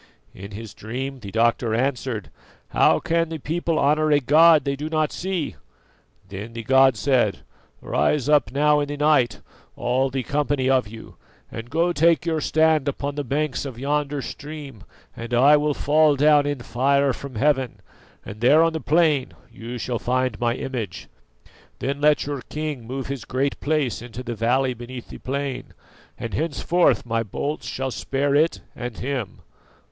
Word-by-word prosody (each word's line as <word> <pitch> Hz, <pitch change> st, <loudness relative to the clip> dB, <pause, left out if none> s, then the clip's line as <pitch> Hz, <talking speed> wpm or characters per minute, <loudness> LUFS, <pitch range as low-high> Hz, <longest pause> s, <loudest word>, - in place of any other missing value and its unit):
"In 100 Hz, +2 st, -9 dB
his 110 Hz, 0 st, -8 dB
dream 130 Hz, +5 st, -5 dB
the 100 Hz, -4 st, -8 dB
doctor 115 Hz, +1 st, +1 dB
answered: 125 Hz, -4 st, -2 dB, 0.4 s
'How -, -, +4 dB
can 165 Hz, -1 st, 0 dB
the 165 Hz, -, -4 dB
people 165 Hz, +2 st, -2 dB
honour 155 Hz, +2 st, +2 dB
a 145 Hz, -1 st, +5 dB
god 155 Hz, +4 st, +6 dB
that 140 Hz, -, 0 dB
they -, -, -2 dB
do 150 Hz, +3 st, -5 dB
not 155 Hz, -1 st, 0 dB
see?' 180 Hz, -4 st, -3 dB, 0.7 s
Then 100 Hz, +4 st, -8 dB
the 115 Hz, -1 st, -6 dB
god 130 Hz, 0 st, +4 dB
said: 120 Hz, -3 st, +1 dB, 0.4 s
'Rise 145 Hz, -3 st, 0 dB
up 150 Hz, -7 st, +3 dB
now 150 Hz, +2 st, +3 dB
in 145 Hz, -, -1 dB
the 145 Hz, 0 st, -5 dB
night, 145 Hz, -5 st, +2 dB, 0.3 s
all 130 Hz, +2 st, 0 dB
the 130 Hz, 0 st, -3 dB
company 145 Hz, -2 st, 0 dB
of 130 Hz, -4 st, +2 dB
you, 110 Hz, +2 st, -12 dB, 0.3 s
and 115 Hz, +1 st, -7 dB
go 170 Hz, +5 st, +1 dB
take 165 Hz, +1 st, +3 dB
your 160 Hz, -2 st, 0 dB
stand 155 Hz, -1 st, +2 dB
upon 140 Hz, +1 st, -2 dB
the 145 Hz, 0 st, -3 dB
banks 145 Hz, +2 st, -1 dB
of 135 Hz, -5 st, -7 dB
yonder 145 Hz, +1 st, -1 dB
stream, 145 Hz, -6 st, -8 dB, 0.3 s
and 115 Hz, +1 st, -4 dB
I 140 Hz, +5 st, +6 dB
will 150 Hz, -1 st, +1 dB
fall 150 Hz, 0 st, +3 dB
down 145 Hz, 0 st, +4 dB
in 145 Hz, -3 st, -2 dB
fire 140 Hz, +3 st, +1 dB
from 140 Hz, -1 st, -9 dB
heaven, 130 Hz, 0 st, +1 dB, 0.5 s
and 105 Hz, -, -9 dB
there 150 Hz, +7 st, +6 dB
on 165 Hz, 0 st, +1 dB
the 160 Hz, -, -3 dB
plain 155 Hz, -4 st, +2 dB, 0.2 s
you 120 Hz, +2 st, -7 dB
shall 120 Hz, 0 st, -3 dB
find 130 Hz, -2 st, -1 dB
my 120 Hz, -1 st, +1 dB
image. 120 Hz, -9 st, -5 dB, 0.7 s
Then 140 Hz, +2 st, -3 dB
let 150 Hz, 0 st, +3 dB
your 145 Hz, -2 st, -4 dB
king 150 Hz, -6 st, -4 dB
move 130 Hz, +2 st, -4 dB
his 135 Hz, -4 st, -5 dB
Great 135 Hz, +2 st, -2 dB
Place 145 Hz, -7 st, -1 dB
into 120 Hz, +1 st, -8 dB
the 120 Hz, -1 st, -4 dB
valley 125 Hz, +4 st, +1 dB
beneath 120 Hz, +1 st, -9 dB
the -, -, -9 dB
plain, 135 Hz, 0 st, -4 dB, 0.4 s
and 115 Hz, -3 st, -6 dB
henceforth 165 Hz, -, +1 dB
my 115 Hz, -1 st, 0 dB
bolts 140 Hz, +8 st, -4 dB
shall 135 Hz, 0 st, -3 dB
spare 140 Hz, +3 st, -1 dB
it 155 Hz, +3 st, +2 dB
and 120 Hz, -3 st, -6 dB
him. 130 Hz, -7 st, -4 dB
140 Hz, 170 wpm, -23 LUFS, 120-150 Hz, 0.7 s, god